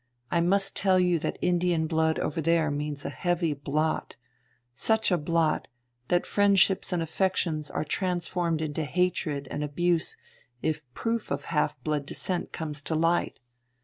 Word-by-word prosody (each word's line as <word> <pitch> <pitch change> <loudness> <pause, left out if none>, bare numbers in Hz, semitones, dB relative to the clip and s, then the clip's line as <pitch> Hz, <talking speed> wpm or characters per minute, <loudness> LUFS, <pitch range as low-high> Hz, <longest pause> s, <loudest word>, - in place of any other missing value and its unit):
I 170 - +3
must 195 +3 +2
tell 190 -2 +3
you 180 -2 +3
that - - -3
Indian 175 -2 +2
blood 160 0 +1
over 160 - -1
there 165 -1 +2
means 145 0 -4
a - - -2
heavy 175 -3 0
blot 150 +3 -1 0.6
such 220 - +2
a 180 - +4
blot, 160 0 +1 0.4
that 175 0 +2
friendships 200 -2 +3
and 175 -2 0
affections 160 -3 0
are - - -2
transformed 175 -1 -1
into 155 +1 -2
hatred 155 -3 0
and 145 - -2
abuse 165 +3 0 0.5
if 155 -5 -2
proof 230 -1 -2
of - - -2
half 150 -4 +1
blood 150 -2 -1
descent 180 +3 -1
comes 150 -2 -3
to 160 - -2
light. 165 +2 +1
165 Hz, 150 wpm, -27 LUFS, 155-180 Hz, 0.6 s, a